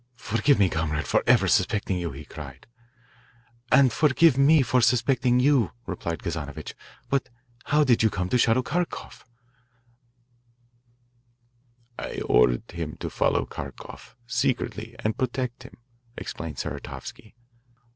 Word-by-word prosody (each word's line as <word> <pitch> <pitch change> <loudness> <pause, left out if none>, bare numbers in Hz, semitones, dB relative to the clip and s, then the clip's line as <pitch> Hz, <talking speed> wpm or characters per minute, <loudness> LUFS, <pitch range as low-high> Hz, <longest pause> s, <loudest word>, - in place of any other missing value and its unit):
"Forgive 125 +5 +2
me, 100 - +4
comrade, 80 -3 -2
for - - +2
ever - - +5
suspecting 100 -2 +1
you," 85 -1 -3
he 70 +1 -9
cried. 70 -4 -10 1.1
"And 130 -1 +5
forgive 155 0 +4
me 140 +2 +5
for 125 +1 +2
suspecting 125 +1 +2
you," 130 - +3
replied 85 -1 -5
Kazanovitch, 75 -2 -5 0.3
"but 140 -1 -1 0.4
how 150 +1 +3
did 125 -5 +3
you 110 - +4
come 90 -3 -3
to 125 - +2
shadow 120 +2 +3
Kharkoff?" 175 +5 -4 2.8
"I - - -5
ordered - - +2
him - - -5
to - - -5
follow - - +1
Kharkoff 70 -3 -10
secretly 120 -2 -2
and 110 +3 -1
protect 125 -1 -2
him," 125 - -13 0.4
explained 80 -3 -6
Saratovsky. 105 - -7
115 Hz, 125 wpm, -25 LUFS, 85-130 Hz, 2.8 s, ever